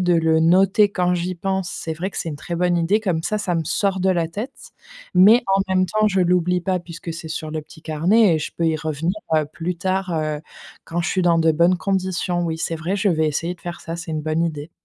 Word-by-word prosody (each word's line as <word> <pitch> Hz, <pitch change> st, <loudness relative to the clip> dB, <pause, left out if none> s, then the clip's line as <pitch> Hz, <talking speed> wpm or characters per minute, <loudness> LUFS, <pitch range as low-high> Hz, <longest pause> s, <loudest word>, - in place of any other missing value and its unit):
de 180 Hz, -1 st, +3 dB
le 160 Hz, -1 st, +3 dB
noter 195 Hz, +5 st, +4 dB
quand 180 Hz, -2 st, +1 dB
j'y 180 Hz, +1 st, -2 dB
pense 190 Hz, +1 st, -2 dB
c'est 160 Hz, -, -5 dB
vrai 175 Hz, +4 st, -3 dB
que -, -, -12 dB
c'est 165 Hz, -, -3 dB
une 145 Hz, -, -6 dB
très 170 Hz, +4 st, -6 dB
bonne 175 Hz, 0 st, +1 dB
idée 190 Hz, +6 st, +2 dB
comme 180 Hz, -6 st, -1 dB
ça 215 Hz, +5 st, -1 dB
ça 185 Hz, -4 st, -1 dB
me 165 Hz, -, -1 dB
sort 195 Hz, +3 st, 0 dB
de 190 Hz, -, +2 dB
la 170 Hz, -3 st, +1 dB
tête. 215 Hz, +10 st, -7 dB, 0.4 s
Mais 210 Hz, +7 st, +7 dB
en 195 Hz, -, +3 dB
même 185 Hz, 0 st, +3 dB
temps 215 Hz, +3 st, +1 dB
je 190 Hz, -2 st, +1 dB
l'oublie 180 Hz, 0 st, +1 dB
pas 185 Hz, -1 st, 0 dB
puisque 170 Hz, -1 st, -8 dB
c'est 160 Hz, -1 st, -8 dB
sur 155 Hz, -1 st, -5 dB
le 155 Hz, 0 st, -3 dB
petit 160 Hz, +2 st, -16 dB
carnet 175 Hz, +5 st, +3 dB
et -, -, -1 dB
je 155 Hz, -, -4 dB
peux 170 Hz, -, 0 dB
y 160 Hz, -, +1 dB
revenir, 155 Hz, +3 st, -2 dB, 0.2 s
heu, 155 Hz, -1 st, +3 dB
plus 170 Hz, +1 st, -3 dB
tard, 190 Hz, +1 st, -1 dB
heu, 155 Hz, -1 st, -2 dB, 0.4 s
quand 170 Hz, +1 st, -2 dB
je 175 Hz, -, -1 dB
suis 185 Hz, -, 0 dB
dans 170 Hz, -1 st, +3 dB
de 165 Hz, 0 st, +3 dB
bonnes 170 Hz, +3 st, +3 dB
conditions. 185 Hz, -2 st, -1 dB
Oui 160 Hz, -1 st, -2 dB
c'est 165 Hz, 0 st, -2 dB
vrai 170 Hz, +6 st, -2 dB
je 200 Hz, -1 st, +2 dB
vais 160 Hz, -1 st, +1 dB
essayer 165 Hz, +4 st, -2 dB
de -, -, -25 dB
faire 175 Hz, 0 st, -7 dB
ça 165 Hz, -, -5 dB
c'est 165 Hz, 0 st, -7 dB
une 155 Hz, -1 st, -2 dB
bonne 155 Hz, +1 st, 0 dB
idée. 155 Hz, -1 st, -3 dB
175 Hz, 260 wpm, -21 LUFS, 160-190 Hz, 0.4 s, Mais